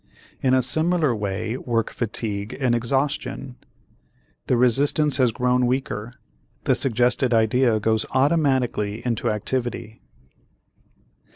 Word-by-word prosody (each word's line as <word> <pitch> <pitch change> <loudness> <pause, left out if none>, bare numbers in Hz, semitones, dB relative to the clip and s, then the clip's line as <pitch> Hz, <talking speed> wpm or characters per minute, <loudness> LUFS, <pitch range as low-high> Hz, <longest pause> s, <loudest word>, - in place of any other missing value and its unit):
In 130 -1 +3
a 130 - +2
similar 155 0 +1
way 105 +3 -3
work 115 -4 -1
fatigue 105 -2 -3
and 130 -3 +1
exhaustion. 135 +1 -2 0.9
The 125 - +2
resistance 140 +4 +2
has 125 -3 +3
grown 125 +2 +1
weaker, 125 -3 -3 0.5
the - - +2
suggested 125 0 +1
idea 115 +1 +2
goes 110 +1 0
automatically 130 -7 +1
into 120 -1 -1
activity. 115 +1 -3
125 Hz, 105 wpm, -23 LUFS, 110-130 Hz, 0.9 s, In